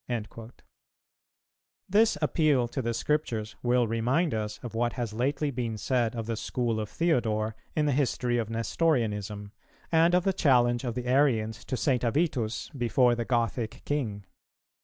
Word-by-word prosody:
"[304:1] 115 Hz, -1 st, -5 dB, 1.4 s
This 210 Hz, -2 st, +3 dB
appeal 150 Hz, -5 st, +2 dB
to 135 Hz, +3 st, -3 dB
the 115 Hz, -1 st, -1 dB
Scriptures 115 Hz, -4 st, -1 dB
will 120 Hz, -1 st, +2 dB
remind 125 Hz, +9 st, +1 dB
us 105 Hz, -1 st, -3 dB
of 120 Hz, -, -6 dB
what 120 Hz, +1 st, 0 dB
has 120 Hz, -4 st, -4 dB
lately 140 Hz, +5 st, 0 dB
been 120 Hz, -3 st, -3 dB
said 120 Hz, 0 st, 0 dB
of 115 Hz, -1 st, -3 dB
the 115 Hz, 0 st, -2 dB
school 115 Hz, 0 st, -2 dB
of 105 Hz, -1 st, -4 dB
Theodore 110 Hz, -10 st, 0 dB, 0.2 s
in 150 Hz, -, +2 dB
the 145 Hz, -, +2 dB
history 125 Hz, -3 st, 0 dB
of 110 Hz, -2 st, -3 dB
Nestorianism, 110 Hz, -, -1 dB, 0.4 s
and 165 Hz, +2 st, +4 dB
of 180 Hz, -, +3 dB
the 195 Hz, 0 st, +1 dB
challenge 120 Hz, -8 st, +3 dB
of 120 Hz, -3 st, -3 dB
the 125 Hz, -1 st, -4 dB
Arians 125 Hz, -4 st, +1 dB
to 130 Hz, -, -3 dB
St. 125 Hz, -1 st, +1 dB
Avitus 120 Hz, -3 st, 0 dB
before 120 Hz, 0 st, +3 dB
the 120 Hz, -1 st, -2 dB
Gothic 115 Hz, -1 st, -1 dB
King. 110 Hz, -9 st, -2 dB
120 Hz, 160 wpm, -28 LUFS, 115-140 Hz, 1.4 s, and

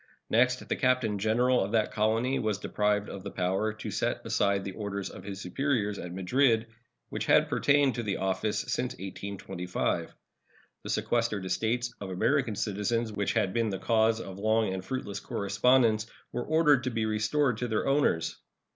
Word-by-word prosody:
Next, 125 Hz, +3 st, +2 dB
the -, -, 0 dB
Captain 125 Hz, -5 st, +1 dB
General 120 Hz, +4 st, +3 dB
of 100 Hz, +3 st, -4 dB
that 110 Hz, -2 st, +2 dB
colony 115 Hz, +5 st, +1 dB
was 110 Hz, -3 st, 0 dB
deprived 105 Hz, 0 st, 0 dB
of 100 Hz, -, -7 dB
the 100 Hz, -, -6 dB
power 95 Hz, +4 st, 0 dB
to 110 Hz, -, -6 dB
set -, -, -1 dB
aside 100 Hz, -1 st, +1 dB
the 95 Hz, -, -4 dB
orders 100 Hz, -1 st, -4 dB
of -, -, -10 dB
his 100 Hz, -1 st, -6 dB
superiors 105 Hz, 0 st, -1 dB
at 90 Hz, -, -6 dB
Madrid, 115 Hz, +5 st, +2 dB, 0.4 s
which -, -, -4 dB
had -, -, +5 dB
pertained 145 Hz, -2 st, +3 dB
to 120 Hz, -, -3 dB
the 105 Hz, -4 st, -2 dB
office 95 Hz, +2 st, -1 dB
since 125 Hz, +1 st, -2 dB
1825. 95 Hz, -2 st, -4 dB, 0.7 s
The -, -, -8 dB
sequestered 115 Hz, -5 st, 0 dB
estates 120 Hz, +5 st, -1 dB
of 100 Hz, -, -5 dB
American 115 Hz, +5 st, +1 dB
citizens, 110 Hz, +3 st, -1 dB
which 100 Hz, -1 st, -1 dB
had 105 Hz, -5 st, +1 dB
been 115 Hz, -2 st, +1 dB
the 95 Hz, -, -2 dB
cause 115 Hz, +1 st, +2 dB
of 95 Hz, -3 st, -8 dB
long 110 Hz, -1 st, +2 dB
and 95 Hz, -1 st, -4 dB
fruitless 105 Hz, -2 st, -4 dB
correspondence, 110 Hz, +2 st, +2 dB, 0.2 s
were 120 Hz, -, -2 dB
ordered 150 Hz, -4 st, +4 dB
to -, -, +1 dB
be 115 Hz, -2 st, -1 dB
restored 110 Hz, +4 st, +1 dB
to 125 Hz, -, -1 dB
their 110 Hz, -2 st, -1 dB
owners. 135 Hz, -, +1 dB
110 Hz, 175 wpm, -29 LUFS, 100-120 Hz, 0.7 s, had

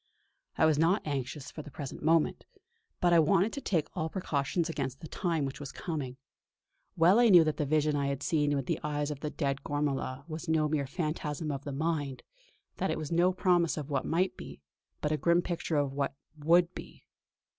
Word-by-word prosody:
I -, -, +4 dB
was 155 Hz, -2 st, +3 dB
not 170 Hz, +6 st, +2 dB
anxious 140 Hz, -1 st, -4 dB
for 155 Hz, -, -7 dB
the 150 Hz, -, -11 dB
present 140 Hz, -1 st, -7 dB
moment; 160 Hz, 0 st, +2 dB, 0.6 s
but 175 Hz, -1 st, +4 dB
I 170 Hz, -, +7 dB
wanted 190 Hz, +6 st, +3 dB
to 280 Hz, -, -4 dB
take 165 Hz, -, 0 dB
all 160 Hz, 0 st, -1 dB
precautions 160 Hz, -2 st, -1 dB
against 135 Hz, -5 st, -3 dB
the 160 Hz, -, -8 dB
time 165 Hz, -3 st, -1 dB
which 135 Hz, -, -5 dB
was 145 Hz, -2 st, -6 dB
coming. 145 Hz, -7 st, -4 dB, 0.8 s
Well 175 Hz, +7 st, +6 dB
I 240 Hz, -1 st, +6 dB
knew 175 Hz, -4 st, +8 dB
that 155 Hz, -1 st, -1 dB
the 150 Hz, -, -1 dB
vision 150 Hz, 0 st, +2 dB
I 140 Hz, -1 st, 0 dB
had 140 Hz, -1 st, -3 dB
seen 145 Hz, -3 st, +1 dB
with 135 Hz, -2 st, -2 dB
the -, -, -1 dB
eyes 150 Hz, 0 st, -1 dB
of 145 Hz, -, -5 dB
the 150 Hz, -, -3 dB
dead 140 Hz, -3 st, -2 dB
Gormala 140 Hz, -2 st, -2 dB
was 160 Hz, 0 st, -6 dB
no 155 Hz, -1 st, +3 dB
mere 150 Hz, -2 st, -1 dB
phantasm 155 Hz, 0 st, -3 dB
of 140 Hz, 0 st, -5 dB
the 145 Hz, -, -3 dB
mind; 145 Hz, -2 st, -2 dB, 0.5 s
that -, -, -1 dB
it -, -, -1 dB
was 155 Hz, -1 st, -5 dB
no 175 Hz, +2 st, +4 dB
promise 180 Hz, -3 st, +2 dB
of 150 Hz, -1 st, -5 dB
what 135 Hz, -2 st, -1 dB
might 180 Hz, +3 st, +1 dB
be, -, -, -10 dB, 0.4 s
but 150 Hz, -, 0 dB
a 155 Hz, -, +1 dB
grim 170 Hz, +2 st, +3 dB
picture 170 Hz, -2 st, -2 dB
of 140 Hz, -2 st, 0 dB
what 140 Hz, -1 st, -2 dB, 0.2 s
would 170 Hz, +3 st, +3 dB
be. -, -, -10 dB
155 Hz, 210 wpm, -30 LUFS, 145-170 Hz, 0.8 s, knew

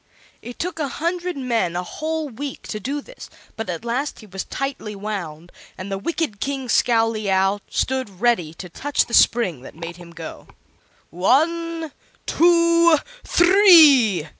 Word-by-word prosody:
It 245 Hz, -, -9 dB
took 340 Hz, -1 st, -4 dB
a 295 Hz, -, -1 dB
hundred 345 Hz, +3 st, -3 dB
men 230 Hz, -10 st, -1 dB
a 180 Hz, -, -2 dB
whole 315 Hz, -, -4 dB
week 275 Hz, +2 st, -7 dB
to 215 Hz, -, -4 dB
do 280 Hz, +7 st, -4 dB
this; -, -, -13 dB, 0.3 s
but 225 Hz, -3 st, -5 dB
at 175 Hz, +5 st, -5 dB
last 255 Hz, +5 st, -2 dB
he -, -, -13 dB
was 190 Hz, -2 st, -6 dB
tightly 270 Hz, -6 st, -5 dB
wound, 175 Hz, -6 st, -6 dB, 0.3 s
and 190 Hz, +2 st, -7 dB
the 195 Hz, -, -2 dB
wicked 310 Hz, -4 st, -3 dB
King 270 Hz, -2 st, -3 dB
Scowleyow 215 Hz, -5 st, +2 dB
stood 255 Hz, -8 st, -2 dB
ready 225 Hz, -9 st, +1 dB
to 180 Hz, -, -8 dB
touch 285 Hz, +11 st, -1 dB
the 235 Hz, -, -12 dB
spring 195 Hz, -, +3 dB
that -, -, -12 dB
made 165 Hz, +1 st, -8 dB
him 175 Hz, -1 st, -13 dB
go. 170 Hz, -, -10 dB, 0.6 s
"One 325 Hz, -, 0 dB, 0.3 s
two 335 Hz, -1 st, +4 dB, 0.3 s
three!" 315 Hz, -, +6 dB
240 Hz, 150 wpm, -21 LUFS, 195-315 Hz, 0.6 s, three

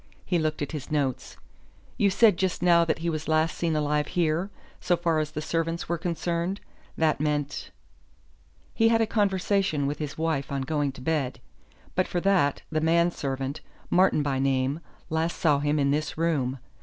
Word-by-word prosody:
He 175 Hz, -2 st, +1 dB
looked 155 Hz, -1 st, -1 dB
at 145 Hz, -, -5 dB
his 150 Hz, -4 st, -6 dB
notes. 140 Hz, -4 st, -2 dB, 0.6 s
"You 200 Hz, -, +3 dB
said 210 Hz, +1 st, +5 dB
just 185 Hz, -1 st, -1 dB
now 170 Hz, -1 st, +6 dB
that 165 Hz, -, 0 dB
he -, -, +2 dB
was 155 Hz, 0 st, -4 dB
last 155 Hz, 0 st, +2 dB
seen 165 Hz, -2 st, -1 dB
alive 150 Hz, -1 st, +1 dB
here, 170 Hz, +2 st, 0 dB, 0.3 s
'so 175 Hz, -1 st, +1 dB
far 165 Hz, -2 st, +1 dB
as 155 Hz, -1 st, -1 dB
the 155 Hz, 0 st, -5 dB
servants 165 Hz, +1 st, -2 dB
were 170 Hz, 0 st, -1 dB
concerned.' 170 Hz, +2 st, -2 dB, 0.4 s
That 155 Hz, -3 st, +2 dB
meant 145 Hz, -1 st, -2 dB, 0.5 s
?" -, -, -34 dB
"He 225 Hz, -, +3 dB
had 225 Hz, 0 st, +3 dB
a -, -, +4 dB
conversation 195 Hz, -7 st, +1 dB
with 145 Hz, +1 st, -2 dB
his 150 Hz, -2 st, -5 dB
wife 160 Hz, -4 st, -1 dB
on 135 Hz, -1 st, -1 dB
going 145 Hz, 0 st, 0 dB
to 130 Hz, -, -11 dB
bed. 140 Hz, -2 st, -1 dB, 0.5 s
But 185 Hz, -, +1 dB
for 175 Hz, -, -1 dB
that, 180 Hz, -8 st, +2 dB
the 155 Hz, -1 st, 0 dB
man 170 Hz, +2 st, +3 dB
servant, 135 Hz, -1 st, -4 dB, 0.3 s
Martin 180 Hz, -4 st, +4 dB
by 135 Hz, -2 st, -1 dB
name, 135 Hz, +2 st, +1 dB, 0.3 s
last 160 Hz, +1 st, 0 dB
saw 150 Hz, -4 st, +3 dB
him 145 Hz, +1 st, +1 dB
in 140 Hz, -1 st, +2 dB
this 150 Hz, +2 st, -1 dB
room. 145 Hz, -6 st, 0 dB
155 Hz, 185 wpm, -26 LUFS, 145-170 Hz, 0.6 s, now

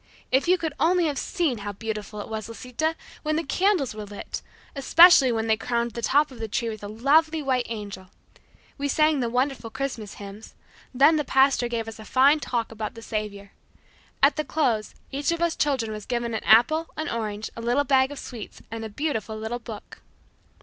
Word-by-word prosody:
If 265 Hz, +5 st, +2 dB
you 365 Hz, +1 st, +5 dB
could 320 Hz, -3 st, -3 dB
only 350 Hz, +1 st, +3 dB
have 290 Hz, -4 st, -1 dB
seen 325 Hz, -, -1 dB
how 205 Hz, 0 st, -5 dB
beautiful 210 Hz, 0 st, -5 dB
it -, -, -8 dB
was, 220 Hz, 0 st, -5 dB
Lisita, 250 Hz, +7 st, -2 dB, 0.3 s
when 310 Hz, 0 st, -1 dB
the 325 Hz, -, 0 dB
candles 360 Hz, -, +1 dB
were 215 Hz, 0 st, -6 dB
lit, 205 Hz, 0 st, -7 dB, 0.3 s
especially 280 Hz, -1 st, +7 dB
when 225 Hz, -1 st, -1 dB
they 220 Hz, -1 st, +3 dB
crowned 235 Hz, +1 st, -1 dB
the 235 Hz, -, -6 dB
top 285 Hz, +5 st, +3 dB
of 250 Hz, -, -12 dB
the 225 Hz, -, -3 dB
tree 230 Hz, +2 st, -1 dB
with 215 Hz, -2 st, -7 dB
a -, -, -4 dB
lovely 300 Hz, +9 st, +2 dB
white 255 Hz, -3 st, 0 dB
angel. 200 Hz, -4 st, -6 dB, 0.7 s
We 285 Hz, -, 0 dB
sang 305 Hz, +1 st, +3 dB
the 240 Hz, -2 st, 0 dB
wonderful 250 Hz, -1 st, -1 dB
Christmas 225 Hz, -3 st, -5 dB
hymns. 205 Hz, +2 st, -10 dB, 0.4 s
Then 285 Hz, +5 st, +5 dB
the 300 Hz, -, 0 dB
pastor 265 Hz, -2 st, +3 dB
gave 230 Hz, -1 st, -3 dB
us 225 Hz, 0 st, -8 dB
a -, -, -8 dB
fine 275 Hz, +6 st, +4 dB
talk 235 Hz, -6 st, -2 dB
about 220 Hz, 0 st, -5 dB
the 230 Hz, -, -10 dB
Saviour. 205 Hz, -2 st, -5 dB, 0.7 s
At 280 Hz, +1 st, +5 dB
the 305 Hz, -, 0 dB
close, 240 Hz, -10 st, -1 dB, 0.2 s
each 285 Hz, +3 st, 0 dB
of 335 Hz, -, -1 dB
us 340 Hz, -1 st, +1 dB
children 260 Hz, -7 st, 0 dB
was 215 Hz, -1 st, -7 dB
given 235 Hz, -2 st, -2 dB
an 220 Hz, -, -3 dB
apple, 255 Hz, +9 st, +5 dB
an 310 Hz, 0 st, -2 dB
orange, 215 Hz, -2 st, -3 dB
a 230 Hz, -, -6 dB
little 245 Hz, +5 st, +2 dB
bag 265 Hz, -1 st, +3 dB
of 290 Hz, -, -7 dB
sweets, 235 Hz, -6 st, -8 dB
and 225 Hz, 0 st, -5 dB
a 220 Hz, -, -5 dB
beautiful 220 Hz, -3 st, -3 dB
little 220 Hz, +3 st, -4 dB
book." 225 Hz, -3 st, -10 dB
240 Hz, 205 wpm, -25 LUFS, 220-290 Hz, 0.7 s, especially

